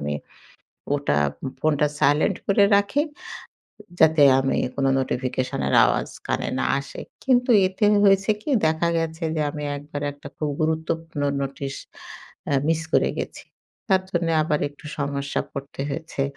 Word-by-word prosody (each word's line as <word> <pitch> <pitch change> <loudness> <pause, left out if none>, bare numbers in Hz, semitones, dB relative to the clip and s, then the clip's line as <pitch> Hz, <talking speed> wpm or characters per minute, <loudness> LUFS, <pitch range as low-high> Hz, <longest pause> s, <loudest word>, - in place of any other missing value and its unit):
আমি 75 0 -2 0.8
ওটা 75 - 0 0.4
ফোনটা 150 -1 +2
সাইলেন্ট 145 +1 +3
করে 200 0 +4
রাখি 205 +9 +1 1.0
যাতে 160 -1 +5 0.2
আমি 135 0 0 0.2
কোন 135 -1 0
নোটিফিকেশনের 125 - -2
আওয়াজ - - 0 0.2
কানে - - -1
না - - 0
আসে। 140 - -8 0.2
কিন্তু 250 -1 +3 0.2
এতে 190 +3 -1 0.2
হয়েছে 195 +1 +4
কি 300 - -6 0.2
দেখা 160 +2 +1
গেছে 165 +1 -3
যে 155 - 0
আমি 150 -1 -6
একবার 145 0 -7
একটা 145 - -12
খুব 150 -1 -2
গুরুত্বপূর্ণ 160 0 -2 0.2
নোটিশ 135 0 -4 0.8
আ - - +2
মিস 165 0 +1
করে - - +4
গেছি। - - -5 0.5
তার 190 -1 +4
জন্যে 170 -2 0
আবার 150 -1 0
একটু 145 +2 -18
সমস্যা 140 0 -2
পড়তে 140 0 -7
হয়েছে। 150 -1 -3
155 Hz, 140 wpm, -23 LUFS, 140-165 Hz, 1.0 s, যাতে